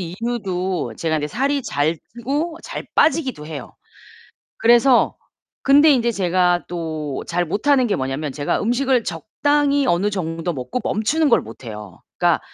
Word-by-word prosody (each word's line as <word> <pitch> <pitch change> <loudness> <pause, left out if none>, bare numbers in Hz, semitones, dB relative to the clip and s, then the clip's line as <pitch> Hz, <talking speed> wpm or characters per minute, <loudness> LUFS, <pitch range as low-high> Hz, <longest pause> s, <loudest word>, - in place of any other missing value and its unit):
이유도 185 -1 -3
제가 160 -1 0
인제 150 0 -2
살이 275 - 0
잘 150 -1 0 0.2
찌고 290 +8 -2
잘 - - -6
빠지기도 270 - +2
해요. 150 -5 -8 0.9
그래서 240 +2 +4 0.5
근데 290 +3 +6
인제 240 -3 +2
제가 180 -2 +1
또 155 -5 -4
잘 175 +1 0
못하는 255 - +2
게 205 - +1
뭐냐면 135 +2 -3
제가 145 +1 -1
음식을 245 +1 +1
적당히 285 - 0
어느 190 0 +2
정도 165 -3 -3
먹고 130 - -4
멈추는 290 +9 +1
걸 240 - +4
못 115 +4 -12
해요. 105 -5 -9 0.2
그러니까 - - +3
195 Hz, 295 characters per minute, -21 LUFS, 160-265 Hz, 0.9 s, 근데